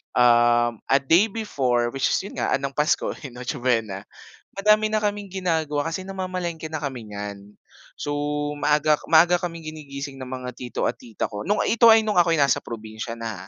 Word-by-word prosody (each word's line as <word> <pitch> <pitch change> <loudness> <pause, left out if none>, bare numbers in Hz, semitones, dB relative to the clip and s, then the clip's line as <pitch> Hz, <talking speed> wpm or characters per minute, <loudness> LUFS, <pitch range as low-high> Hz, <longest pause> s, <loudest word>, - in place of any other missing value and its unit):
Uhm, 120 -1 +4
a 135 +1 +4
day 165 +9 +4
before, 130 - -1
which 135 +1 0
is - - +1
'yon 200 - -9
nga - - 0
ng 140 0 -2
Pasko, 150 +2 +1 0.3
Noche 125 +3 -4
Buena. 115 -6 -1 0.5
Madami 215 +2 +4
na 215 0 -1
kaming 205 -1 -1
ginagawa 160 -6 -1
kasi 185 +3 -5
namamalengke 180 -4 -4
na 155 - -3
kami 130 -5 -5
nyan. 100 0 -7 0.5
So, 145 - -3 0.4
maaga 150 +1 +3
maaga 170 +2 +5
kaming 170 -2 -5
ginigising 140 -3 -7
ng 130 -1 -8
mga 130 -1 -5
tito 125 -1 -3
at - - -2
tita 115 -3 -5
ko, 105 -1 -6
no'ng 205 +1 0
ito 230 0 +6
ay 220 -1 +5
nung 210 - 0
ako'y 170 -2 +4
nasa 140 -1 +2
probinsiya 110 0 -7
na 110 -5 -6
145 Hz, 180 wpm, -24 LUFS, 120-180 Hz, 0.5 s, ito